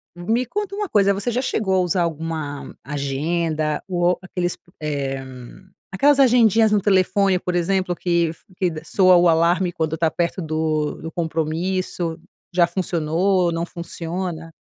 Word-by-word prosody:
Me 225 +8 0
conta 410 - -4
uma 415 -2 -3
coisa, 200 -1 +3
você 200 +5 -2
já 245 - 0
chegou 215 -7 -1
a - - +3
usar 180 0 +1
alguma 160 -3 -4
agenda 150 +2 -1
ou 175 -1 +1
aqueles 180 -1 -3
p - - -59 0.2
eh, 135 -3 -2 0.7
aquelas 280 +9 +3
agendinhas 230 -4 +5
no 205 -2 +3
telefone, 195 -1 +3
por 180 0 -3
exemplo, 180 0 0
que 170 -1 +1
f 160 - -10
que 185 - +1
d 160 -1 -7
soa 185 +1 +4
o 175 0 +5
alarme 170 +2 +2
quando 160 -2 -2
tá 160 0 +1
perto 170 +2 -1
do 155 -1 -1
do 165 +1 -6
compromisso? 165 +1 -2 0.3
Já 175 -1 +4
funcionou, 175 +1 0
não 165 +1 -2
funciona? 170 -1 -5
175 Hz, 155 wpm, -21 LUFS, 160-190 Hz, 0.7 s, agendinhas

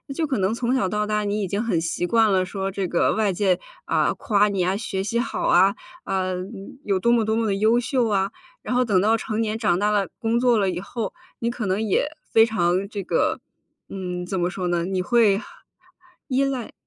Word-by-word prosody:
就 325 - 0
可 270 -3 -1
能 195 +2 +1
从 240 +2 0
小 250 -7 +1
到 210 +1 -1
大 210 0 0
你 205 +1 -1
已 195 - -1
经 200 +4 -2
很 195 -8 0
习 165 +1 -2
惯 225 +1 +3
了 185 -1 +2
说 195 +1 -3
这 195 -1 -2
个 175 - +2
外 215 -3 +1
界， 185 0 +1 0.3
啊， - - +1
夸 210 -2 +2
你 200 -1 -2
呀， 185 +2 +1
学 195 -3 -3
习 230 +4 -1
好 245 - -2
啊， 190 +3 +5 0.3
啊， 190 -1 -1
嗯， 195 +5 -7
有 195 -2 +1
多 235 +5 +2
么 235 -2 +3
多 220 +1 0
么 225 0 0
地 200 - +1
优 220 +3 +4
秀 245 0 0
啊， 195 -1 +1 0.3
然 250 - -3
后 250 0 +3
等 195 -5 +3
到 220 +3 +3
成 220 0 -3
年 220 -1 -1
长 210 -6 +1
大 205 +1 +2
了 205 -2 +1
工 230 +1 +1
作 245 -2 +3
了 195 -2 +1
以 175 -1 -3
后， 215 +4 -5 0.3
你 235 - -1
可 235 -2 -4
能 195 +2 0
也， 220 +6 +1 0.3
非 225 0 +7
常 190 -3 0
这 205 -2 -4
个， - - 0 0.5
嗯， 180 -2 -5
怎 190 +1 -3
么 175 0 +1
说 180 0 -3
呢？ 175 -1 0
你 185 0 -1
会 215 -1 +3 0.9
依 270 0 +2
赖 265 -4 -3
205 Hz, 245 characters per minute, -23 LUFS, 190-230 Hz, 0.9 s, 非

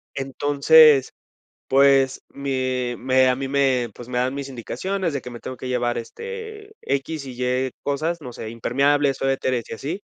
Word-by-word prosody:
Entonces, 145 +1 +5 0.6
pues, 135 -1 +4
me 130 -3 -2
me 130 +1 +3
a 125 - +2
mí 135 +1 -4
me, 135 -3 +1
pues, 120 - -11
me 125 - -2
dan 125 +1 0
mis 140 0 -5
indicaciones 170 - -3
de 140 - -2
que 125 - -8
me 120 -1 -9
tengo 130 - -7
que 130 - -7
llevar, 120 -1 0
este, 440 - -8
x 140 +2 -3
y 130 -2 -8
y 125 +1 0
cosas, 155 +5 -2
no 125 -4 -8
sé, 110 - -7
impermeables, 140 +5 +1
suéteres 130 -2 0
y - - -5
así. 155 - -5
135 Hz, 170 wpm, -22 LUFS, 125-145 Hz, 0.6 s, Entonces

